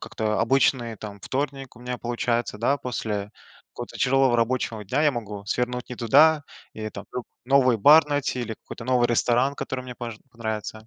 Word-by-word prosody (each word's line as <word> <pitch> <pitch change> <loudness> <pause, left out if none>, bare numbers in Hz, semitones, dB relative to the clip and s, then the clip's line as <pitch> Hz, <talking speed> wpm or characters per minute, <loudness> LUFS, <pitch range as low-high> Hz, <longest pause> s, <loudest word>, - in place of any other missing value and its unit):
как-то 110 -1 -2
обычный, 125 -1 +2
там, 100 -1 -8
вторник 135 0 -4
у 120 - -15
меня 125 0 -4
получается, 120 -2 -1
да, 135 +5 +2
после 105 -5 -4 0.4
какого-то - - -8
тяжелого 130 -1 +3
рабочего 115 -2 -1
дня 135 +10 0
я 150 - +5
могу 105 -5 -6
свернуть 125 +2 -2
не 125 - -6
туда. 145 +6 +5 0.3
И, 110 0 -5
там, 100 - -9
лю 125 - -4 0.2
новый 130 -2 +4
бар 150 +8 +7
найти, 145 -3 -1
или 110 -2 -4
какой-то 115 - -10
новый 125 -1 +2
ресторан, 125 +4 +2
который 130 -1 -4
мне 125 -1 -9
может 115 -3 -6
понравится. 110 -1 -5
120 Hz, 175 wpm, -25 LUFS, 110-135 Hz, 0.4 s, бар